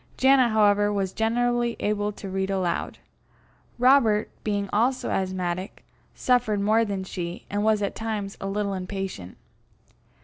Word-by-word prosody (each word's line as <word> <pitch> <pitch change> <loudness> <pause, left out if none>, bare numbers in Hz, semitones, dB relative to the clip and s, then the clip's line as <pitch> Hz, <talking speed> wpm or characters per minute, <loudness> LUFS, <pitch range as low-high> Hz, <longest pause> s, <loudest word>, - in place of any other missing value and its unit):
Janet, 265 -2 +5
however, 205 -1 +3
was 195 -2 -1
generally 240 +1 0
able 205 0 0
to 200 - -9
read 190 0 -2
aloud. 190 -3 -1 0.8
Robert, 240 -4 +4
being 205 -1 -1
also 250 +5 +1
asthmatic, 185 0 -3 0.3
suffered 245 -5 +1
more 215 +3 +3
than 200 -3 -3
she, 175 -1 -6
and 205 0 -1
was 215 -1 +2
at 200 - -1
times 215 -3 -4
a 195 - -3
little 200 0 -1
impatient. 185 - -5
205 Hz, 135 wpm, -25 LUFS, 195-225 Hz, 0.8 s, Janet